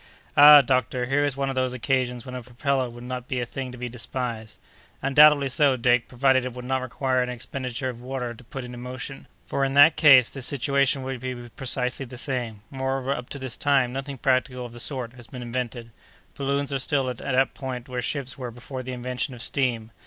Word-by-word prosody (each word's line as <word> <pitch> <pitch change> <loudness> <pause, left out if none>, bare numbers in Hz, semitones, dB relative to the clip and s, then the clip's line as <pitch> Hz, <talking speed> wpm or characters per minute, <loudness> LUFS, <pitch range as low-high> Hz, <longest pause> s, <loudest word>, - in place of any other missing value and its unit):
"Ah! 145 0 +10
doctor, 130 -1 0
here 135 +3 +1
is 145 -2 -1
one 140 0 -1
of - - -2
those 130 -1 0
occasions 125 0 -1
when 125 - -8
a 125 - -5
propeller 125 +2 -1
would 120 +1 -11
not 125 0 -5
be 130 - -2
a 120 - -1
thing 130 +1 -6
to 125 - -10
be 125 0 -4
despised." 120 -2 -5 0.5
"Undoubtedly 145 +1 +6
so, 135 +1 +3
Dick, 120 0 +2
provided 130 +1 +2
it 125 -1 -4
would 125 0 -8
not 130 0 0
require 130 0 0
an 125 - -1
expenditure 125 +1 -4
of 120 -2 -6
water 125 -1 -4
to 125 - -15
put 130 +2 -7
it 125 0 -8
in 120 - -8
motion, 125 +2 -7 0.2
for, 140 - -1
in 135 0 0
that 145 +3 +7
case, 135 -6 +8
the 135 - -8
situation 140 +1 +1
would 130 -1 -4
be 130 +1 -4
precisely 125 +1 -1
the 125 +1 -10
same; 120 -5 -3
moreover, 135 0 -2
up 125 -2 -7
to - - -5
this 130 -3 -4
time, 135 -4 +2
nothing 135 +1 -5
practical 130 -1 0
of 120 - -10
the 120 - -9
sort 125 -2 -3
has 120 -2 -12
been 125 -2 -8
invented. 120 -1 -4 0.4
Balloons 140 0 -1
are 135 - 0
still 135 0 0
at 125 -2 -3
that 135 +1 +1
point 130 -3 -6
where 125 -1 -3
ships 135 0 -3
were 125 -2 -4
before 125 +3 -7
the 130 0 -6
invention 125 +1 -3
of 120 - -9
steam. 120 -5 -1
130 Hz, 220 wpm, -25 LUFS, 125-135 Hz, 0.5 s, Ah